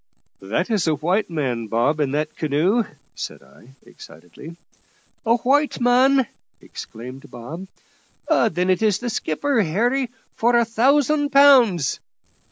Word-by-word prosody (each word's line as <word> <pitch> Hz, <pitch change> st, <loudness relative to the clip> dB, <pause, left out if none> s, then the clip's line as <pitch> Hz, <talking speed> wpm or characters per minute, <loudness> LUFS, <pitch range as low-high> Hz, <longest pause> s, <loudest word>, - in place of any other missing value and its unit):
"That 110 Hz, -, -2 dB
is 205 Hz, -6 st, 0 dB
a 155 Hz, -, +2 dB
white 180 Hz, +9 st, -1 dB
man, 130 Hz, -8 st, -3 dB
Bob, 120 Hz, +8 st, 0 dB
in 145 Hz, -3 st, 0 dB
that 150 Hz, +1 st, -2 dB
canoe," 165 Hz, +10 st, 0 dB, 0.3 s
said -, -, -8 dB
I 135 Hz, +3 st, -20 dB
excitedly. 90 Hz, -, -13 dB, 0.7 s
"A 230 Hz, -, +4 dB
white 285 Hz, +5 st, +1 dB
man!" 255 Hz, +2 st, +3 dB, 0.3 s
exclaimed 125 Hz, +4 st, -10 dB
Bob; 155 Hz, +11 st, -9 dB, 0.6 s
"then 185 Hz, -, +1 dB
it's 200 Hz, +2 st, +1 dB
the 240 Hz, +1 st, -4 dB
skipper, 235 Hz, -, -1 dB
Harry, 240 Hz, +9 st, 0 dB, 0.2 s
for 240 Hz, +2 st, +1 dB
a 235 Hz, -, +3 dB
thousand 285 Hz, +6 st, +2 dB
pounds." 255 Hz, -, +4 dB
195 Hz, 125 wpm, -21 LUFS, 150-245 Hz, 0.7 s, A